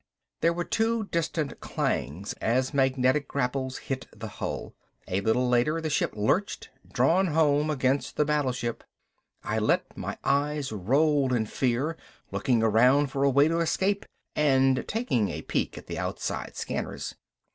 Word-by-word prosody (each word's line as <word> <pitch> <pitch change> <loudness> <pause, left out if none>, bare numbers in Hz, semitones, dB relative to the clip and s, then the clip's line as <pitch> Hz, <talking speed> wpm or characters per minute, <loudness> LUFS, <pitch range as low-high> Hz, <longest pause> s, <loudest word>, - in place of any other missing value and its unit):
There 165 - +3
were 175 +1 -2
two 225 +3 0
distant 160 -3 -1
clangs 90 +9 -2
as 130 +3 +1
magnetic 130 +1 +2
grapples 130 -1 -2
hit 135 -1 -5
the 110 +1 -8
hull. - - -5 0.3
A 95 +2 -1
little 110 +4 +2
later 125 +7 +2
the 160 -1 -3
ship - - +1
lurched, 130 - 0 0.2
drawn 165 +10 +3
home 150 -2 +2
against 135 -1 0
the 150 - +2
battleship. 130 -5 -1 0.6
I - - -1
let - - 0
my - - -5
eyes 145 -1 0
roll 135 - +2
in 110 -2 +1
fear, 130 +8 -1 0.3
looking 120 -4 +1
around 125 +6 +4
for 135 0 0
a 140 - +5
way 140 +2 +5
to 165 +1 +1
escape 195 +4 0 0.3
and 135 -3 +3
taking 135 - 0
a - - -5
peek - - -2
at - - -9
the - - -5
outside - - -4
scanners. - - -4
135 Hz, 150 wpm, -27 LUFS, 125-155 Hz, 0.6 s, a